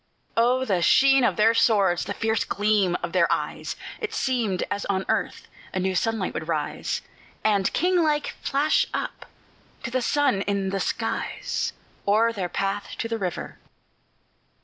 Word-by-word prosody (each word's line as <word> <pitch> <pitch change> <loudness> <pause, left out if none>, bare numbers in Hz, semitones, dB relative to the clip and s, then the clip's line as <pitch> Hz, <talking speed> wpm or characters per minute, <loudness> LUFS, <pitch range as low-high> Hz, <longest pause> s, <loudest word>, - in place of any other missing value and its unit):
Oh, 250 +3 +3
the 190 -7 +1
sheen 270 +7 +5
of - - +2
their 220 +2 +4
swords! 200 -6 +3
the 205 - -4
fierce 225 -1 0
gleam 205 -3 +1
of 170 - -3
their 175 -2 +3
eyes! - - -2 0.2
It 440 -1 -4
seemed 230 -8 0
as 200 - -1
on 190 -1 -1
earth - - -1 0.3
a - - +1
new 190 +1 0
sunlight 220 0 0
would 160 - -5
rise, 155 -3 -2 0.4
And, 200 -3 +2
king 360 +1 +2
like, 300 -2 +1
flash 290 +2 +2
up - - -4 0.6
to 240 - -4
the 255 +1 0
sun 265 -5 +2
in 200 -1 0
the 195 - -1
skies, - - -2 0.3
O'er 225 +3 +4
their 190 -5 -3
path 195 +3 -2
to - - -2
the 230 0 -3
river. 180 -4 -4
215 Hz, 160 wpm, -25 LUFS, 190-255 Hz, 0.6 s, sheen